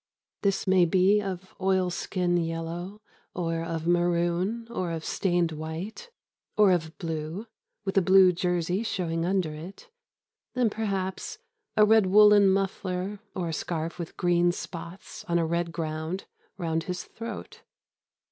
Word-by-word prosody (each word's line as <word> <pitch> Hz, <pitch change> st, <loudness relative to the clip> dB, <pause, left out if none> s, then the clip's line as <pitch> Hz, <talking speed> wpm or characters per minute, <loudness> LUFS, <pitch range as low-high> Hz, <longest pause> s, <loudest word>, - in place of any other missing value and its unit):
This 195 Hz, -1 st, +1 dB
may 185 Hz, -2 st, +5 dB
be 190 Hz, +4 st, +4 dB
of 190 Hz, -1 st, -6 dB
oil 185 Hz, -1 st, +2 dB
skin 175 Hz, 0 st, -1 dB
yellow 170 Hz, +5 st, -4 dB, 0.3 s
or 165 Hz, -2 st, -1 dB
of 165 Hz, -1 st, -3 dB
maroon 175 Hz, +5 st, +1 dB
or 185 Hz, -6 st, -2 dB
of 165 Hz, -1 st, -4 dB
stained 175 Hz, -3 st, +1 dB
white 160 Hz, -, -6 dB, 0.5 s
or 210 Hz, -2 st, +6 dB
of 160 Hz, -2 st, -1 dB
blue, 165 Hz, +4 st, -4 dB, 0.4 s
with 195 Hz, 0 st, +3 dB
a -, -, +1 dB
blue 190 Hz, 0 st, +7 dB
jersey 180 Hz, +2 st, 0 dB
showing 170 Hz, -7 st, -1 dB
under 185 Hz, -5 st, 0 dB
it, 185 Hz, -, -10 dB, 0.6 s
and, 245 Hz, -4 st, +2 dB
perhaps, 195 Hz, -, -3 dB, 0.4 s
a 210 Hz, -, +7 dB
red 220 Hz, -2 st, +5 dB
woollen 205 Hz, 0 st, +7 dB
muffler 195 Hz, 0 st, -1 dB, 0.2 s
or 175 Hz, -3 st, -2 dB
a -, -, -3 dB
scarf 165 Hz, +1 st, -3 dB
with 170 Hz, -, -6 dB
green 175 Hz, 0 st, +3 dB
spots 175 Hz, +1 st, -8 dB
on 170 Hz, -, +1 dB
a 165 Hz, -, +2 dB
red 170 Hz, +1 st, -1 dB
ground 160 Hz, +3 st, -3 dB, 0.3 s
round 165 Hz, -3 st, -1 dB
his 180 Hz, -1 st, -3 dB
throat. 230 Hz, +1 st, -8 dB
180 Hz, 140 wpm, -27 LUFS, 165-195 Hz, 0.6 s, blue